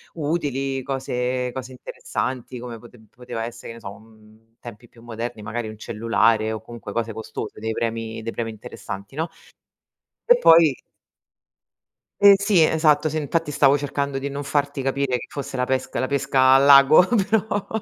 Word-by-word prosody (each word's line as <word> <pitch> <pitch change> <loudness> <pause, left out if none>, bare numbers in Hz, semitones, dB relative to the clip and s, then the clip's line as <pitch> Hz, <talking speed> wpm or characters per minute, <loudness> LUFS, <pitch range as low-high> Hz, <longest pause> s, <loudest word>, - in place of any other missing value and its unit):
utili, 140 -4 -2
cose 125 -1 -2
cose 130 0 -7
interessanti, 125 0 -5
come 120 -1 -7
pote 120 +1 -16
poteva 120 -2 -6
esse' 120 0 -9
che - - -7
ne 115 - -12
so, 100 - -8
un 110 +1 -21
tempi 120 0 -12
più 115 - -19
moderni, 115 -1 -6
magari 115 +1 -5
un 110 - -10
cellulare 110 0 +1
o 110 - -4
comunque 115 -3 -10
cose 115 +1 -3
costose, 110 0 -7
dei 110 0 -2
premi 115 0 -3
dei 115 +1 -5
premi 115 -1 -3
interessanti, 100 0 -9
no? 160 +3 -2 1.0
E - - +8
poi 165 - +6 1.5
Ehm, 200 0 +9
sì, 200 -4 +3
esatto, 155 -1 +3
sì, 155 - -3
infatti 155 +1 -2
stavo 140 -1 +4
cercando 140 -1 -3
di 140 +1 -4
non 140 +1 -5
farti 145 0 -1
capire 135 -1 -1
che - - -8
fosse 140 -2 -6
la 125 - 0
pesca 130 0 -2
la 130 - 0
pesca 135 -1 +3
al 135 +1 +5
lago, 140 +4 +7 0.2
però 210 -2 0
130 Hz, 170 wpm, -22 LUFS, 115-140 Hz, 1.5 s, Ehm